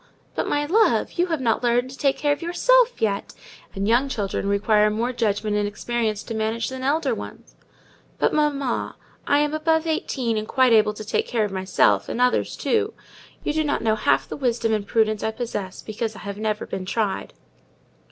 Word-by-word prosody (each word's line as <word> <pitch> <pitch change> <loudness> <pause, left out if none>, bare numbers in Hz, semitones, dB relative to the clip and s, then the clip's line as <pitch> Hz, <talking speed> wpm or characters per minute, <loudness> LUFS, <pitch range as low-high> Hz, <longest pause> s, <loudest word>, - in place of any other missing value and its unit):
"But, - - -2
my 290 0 0
love, 430 +9 +3
you 355 - +3
have 325 -5 -2
not 230 -3 +1
learned 245 +1 +1
to - - -9
take 275 0 +1
care 290 0 +2
of - - -6
_yourself - - +3
_yet: 200 -3 -2 0.4
and 195 +1 -1
young 245 +5 +3
children 200 -4 -2
require 210 +1 +3
more 230 +4 -1
judgment 210 -2 0
and 205 0 +1
experience 220 0 -2
to 230 - -6
manage 220 +1 -1
than 260 0 -6
elder 290 +5 +1
ones." - - -9 0.6
"But, - - +1
mamma, 285 -4 0 0.3
I 285 - +4
am 295 0 +1
above 320 +1 +1
eighteen, 260 -7 -1
and 215 - -6
quite 255 -2 +3
able 210 -1 +4
to 215 - -8
take 215 - -1
care 225 -3 +1
of 205 - -5
myself, 185 - +2
and - - -3
others 250 0 +1
too. 435 -2 0 0.5
You 300 - -1
do 315 0 +1
not 290 -5 -1
know 220 -1 +3
half 215 - +1
the - - -5
wisdom 235 -4 0
and 205 -2 -1
prudence 215 -2 +1
I 220 - 0
possess, 220 -5 -5
because 220 0 -4
I - - -9
have 200 0 -6
never 215 -1 -2
been 185 -1 -5
tried." 210 -2 -2
230 Hz, 200 wpm, -23 LUFS, 210-285 Hz, 0.6 s, I